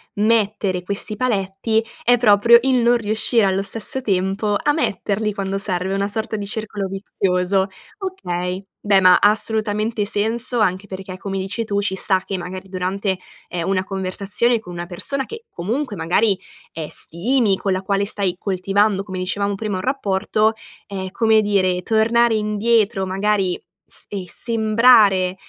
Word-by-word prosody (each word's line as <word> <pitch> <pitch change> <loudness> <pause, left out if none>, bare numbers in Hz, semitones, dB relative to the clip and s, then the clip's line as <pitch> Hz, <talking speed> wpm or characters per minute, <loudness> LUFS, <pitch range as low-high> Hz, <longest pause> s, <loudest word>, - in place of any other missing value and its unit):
mettere 210 -3 +1
questi 200 +3 -3
paletti 215 -1 0 0.2
è 245 +1 +4
proprio 230 +1 +6
il 260 -2 +3
non 240 +1 +4
riuscire 220 0 +1
allo 195 0 +1
stesso 225 +5 -1
tempo 200 -1 0
a 295 - +2
metterli 210 - -1
quando 195 0 -3
serve, 190 -1 0
una 195 0 0
sorta 220 +1 -1
di 205 -1 -4
circolo 205 -1 -4
vizioso. 190 0 0 0.3
Okay. 185 - -4 0.2
Beh, 200 -2 +4
ma 185 -1 +7
ha 205 - +5
assolutamente 215 0 -1
senso 230 +4 0
anche 185 -2 +1
perché, 190 -1 -7
come 195 0 -4
dici 195 +4 -3
tu, 205 -2 -1
sci 200 -1 -1
sta 190 0 +2
che, 195 - -3
magari, 185 +2 -7
durante, 190 +1 -2 0.3
ehm, 170 -2 -4
una 190 -1 0
conversazione 200 +5 0
con 180 -5 -10
una 175 0 -6
persona 270 +10 -3
che, 455 +1 -10
comunque 220 +7 -3
magari, 190 +4 +2 0.4
ehm, 155 -2 -5
stimi, 210 +4 +2
con 195 - -2
la 185 0 0
quale 195 +1 0
stai 195 -3 -1
coltivando, 195 +1 0
come 185 -2 -6
dicevamo 200 +2 -1
prima, 210 -1 -3
un 185 - -3
rapporto, 215 -4 +1 0.4
ehm, 190 -2 -5
come 220 0 +3
dire, 185 -3 +1
tornare 230 +2 +3
indietro, 210 -1 +1
magari, 195 -1 0 0.3
s - - -3
e 195 -3 -5
sembrare, 215 -4 +4
200 Hz, 155 wpm, -20 LUFS, 190-220 Hz, 0.4 s, ma